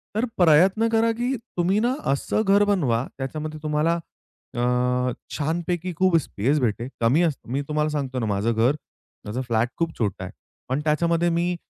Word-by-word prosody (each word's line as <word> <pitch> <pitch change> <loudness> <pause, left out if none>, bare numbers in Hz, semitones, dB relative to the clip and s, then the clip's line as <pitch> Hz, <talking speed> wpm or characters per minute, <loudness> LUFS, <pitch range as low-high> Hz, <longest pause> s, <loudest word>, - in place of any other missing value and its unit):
तर 220 +3 +1
प्रयत्न 185 +6 +5
करा 225 0 +3
की 250 +3 0 0.2
तुम्ही 185 +4 +2
ना 240 +3 +1 0.2
असं 140 +9 0
घर 200 +1 +5
बनवा 130 - +1
त्याच्यामध्ये 155 +3 -5
तुम्हाला 155 +3 +1 0.6
अ, 125 +1 +1 0.3
छानपैकी 170 +3 -2
खूप 185 -3 +4
स्पेस 140 0 0
भेटेल 120 -1 -1
कमी 120 +8 +4
अस 160 - +2
मी 135 +4 -1
तुम्हाला 150 0 0
सांगतो 135 -4 -2
ना 115 - -1
माझं 105 +2 0
घर 115 +6 +2 0.5
माझा 115 +5 -3
फ्लॅट 115 -1 0
खूप 165 -1 -2
छोटा 100 -5 -2
आहे. 95 - -6 0.4
पण 130 +3 0
त्याच्यामध्ये 170 +2 +2
मी 175 +1 0
150 Hz, 165 wpm, -24 LUFS, 125-175 Hz, 0.6 s, प्रयत्न